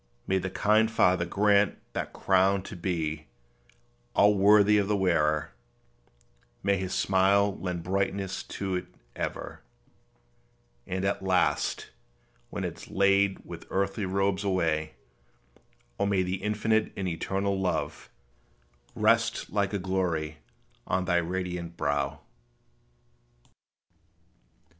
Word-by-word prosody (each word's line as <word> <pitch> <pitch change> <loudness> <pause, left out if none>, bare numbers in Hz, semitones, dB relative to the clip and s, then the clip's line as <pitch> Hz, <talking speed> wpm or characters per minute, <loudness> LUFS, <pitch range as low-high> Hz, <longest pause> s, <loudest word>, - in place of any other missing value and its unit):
May 95 0 +1
the 95 +1 -3
kind 110 +3 +3
Father 90 -5 +3
grant 100 +1 +3 0.2
that - - -3
crown 95 0 +2
to 100 - -8
be 80 -4 -3 0.9
All 105 +1 +6
worthy 105 +1 +5
of 100 - 0
the 105 0 +1
wearer; 75 -6 +1 1.1
may 100 0 +3
His 95 0 -3
smile 100 +1 +3
Lend 90 -2 -3
brightness 95 +1 -1
to 95 -1 -4
it 90 - -6 0.3
ever; - - -5 1.3
and 95 +1 -2
at 100 - 0
last, 95 -1 0 0.6
When - - -4
it - - -4
is - - -12
laid 100 0 +2
with - - -9
earthly 100 +1 -1
robes 100 +1 0
away, 80 -5 0 1.0
O 100 - +2
may 100 -2 +2
the 90 +1 -3
infinite 105 +1 +1
and 95 -2 -2
eternal 95 +3 -1
Love 90 - -2 0.9
Rest - - +2
like 100 0 0
a 100 - -1
glory 90 -5 -2 0.5
on 95 0 0
thy 90 -1 +2
radiant 90 -1 -3
brow. 70 +1 -1
95 Hz, 115 wpm, -28 LUFS, 90-100 Hz, 1.3 s, All